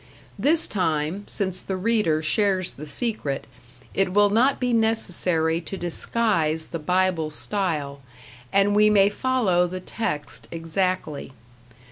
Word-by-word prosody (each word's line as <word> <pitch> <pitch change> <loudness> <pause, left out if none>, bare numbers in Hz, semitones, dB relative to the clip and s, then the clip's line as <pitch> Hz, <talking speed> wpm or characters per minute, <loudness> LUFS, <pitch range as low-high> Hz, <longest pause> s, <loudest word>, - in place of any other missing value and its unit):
This 315 +3 +4
time, 165 +1 -1
since 190 -3 0
the 190 - -4
reader 185 -7 +1
shares 190 +1 +1
the 150 +2 -10
secret, 180 - -3 0.5
it 195 -1 +1
will 205 0 +4
not 255 +6 +3
be 245 -1 0
necessary 180 -7 +1
to 195 +3 -6
disguise 170 -3 0
the 165 - -4
Bible 180 -1 +1
style, 150 -5 -2 0.5
and 200 +1 +3
we 210 0 +5
may 200 -1 +5
follow 205 -6 +1
the 185 +1 -5
text 150 -6 -4
exactly. 165 -4 -3
185 Hz, 125 wpm, -24 LUFS, 160-210 Hz, 0.5 s, we